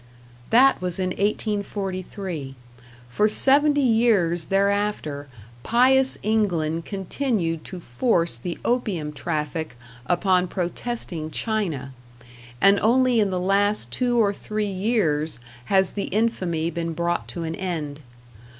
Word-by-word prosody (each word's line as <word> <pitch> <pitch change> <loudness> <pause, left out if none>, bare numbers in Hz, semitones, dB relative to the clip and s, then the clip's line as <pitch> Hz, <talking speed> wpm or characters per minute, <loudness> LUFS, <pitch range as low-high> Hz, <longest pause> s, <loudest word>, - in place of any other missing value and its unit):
That 265 +1 +5
was 180 -2 -2
in 185 -1 -1
1843; 195 -6 -3 0.5
for 210 - +2
seventy 285 +5 +3
years 215 -9 +2
thereafter 200 -7 0 0.3
pious 260 - +3
England 175 -7 0
continued 195 - -2
to 185 - -7
force 170 - 0
the 170 +8 -5
opium 195 -11 -1
traffic 155 -2 -3 0.3
upon 180 0 +2
protesting 175 -3 -4
China, 160 - -2 0.7
and 200 +6 +5
only 250 +1 +3
in 205 -2 +2
the 185 -1 -1
last 195 - +1
two 245 - 0
or 205 -3 +3
three 215 +1 -3
years 185 - 0 0.3
has 190 +2 +2
the 200 - -2
infamy 180 -7 -1
been 165 0 -3
brought 170 +1 -1
to 170 - -5
an 160 0 -3
end. 160 -6 -4
190 Hz, 115 wpm, -24 LUFS, 165-215 Hz, 0.7 s, That